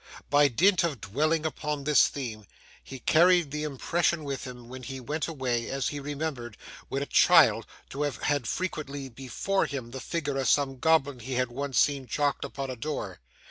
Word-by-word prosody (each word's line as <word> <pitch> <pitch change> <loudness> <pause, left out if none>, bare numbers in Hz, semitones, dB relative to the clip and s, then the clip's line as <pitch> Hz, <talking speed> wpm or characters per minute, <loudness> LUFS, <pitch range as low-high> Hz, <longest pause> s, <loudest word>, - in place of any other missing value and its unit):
By 145 0 +6
dint 180 - +3
of 155 -7 -1
dwelling 155 +11 0
upon 150 -2 -3
this 150 -1 +5
theme, 110 -7 -6 0.4
he 135 - -8
carried 170 +3 +4
the 150 +1 -3
impression 160 +3 0
with 140 -2 -4
him 125 -2 -10
when 130 +1 -9
he 135 +1 -6
went 150 +4 -3
away; 130 -7 -2
as 135 -1 -1
he 145 - -5
remembered, 140 -5 -5 0.3
when 135 +1 -1
a - - -4
child, - - +5 0.2
to 140 - -4
have 145 -6 -1
had 145 -5 0
frequently 145 -6 -4
before 135 +10 -1
him 130 -5 -6
the 130 +1 -6
figure 145 -2 -2
of 135 - +1
some 135 -2 +2
goblin 145 -4 +2
he 130 +3 -6
had 125 -1 0
once 140 +1 -3
seen 140 -3 +2
chalked 145 +1 0
upon 135 -1 -5
a - - -5
door. 115 - -5
140 Hz, 185 wpm, -28 LUFS, 130-150 Hz, 0.4 s, By